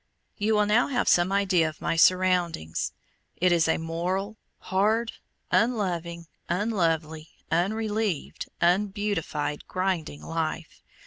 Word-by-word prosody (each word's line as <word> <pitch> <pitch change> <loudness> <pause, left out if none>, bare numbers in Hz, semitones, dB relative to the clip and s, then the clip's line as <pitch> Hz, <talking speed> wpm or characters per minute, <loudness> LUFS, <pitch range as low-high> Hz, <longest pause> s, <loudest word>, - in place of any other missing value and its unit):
You 215 +1 +1
will 210 0 +3
now 215 +4 +3
have 270 - -1
some 175 +2 +4
idea 190 -5 +2
of 155 - -13
my - - -1
surroundings. 175 - +2 0.5
It 180 +1 +3
is 170 -2 +3
a 160 - +2
moral, 180 +6 -3 0.2
hard, 215 +5 +1 0.4
unloving, 175 -7 0 0.2
unlovely, 165 -6 -1 0.2
unrelieved, 210 +1 -1
unbeautified, 180 -5 0
grinding 185 -6 -2
life. 165 0 -4
180 Hz, 110 wpm, -26 LUFS, 165-205 Hz, 0.5 s, some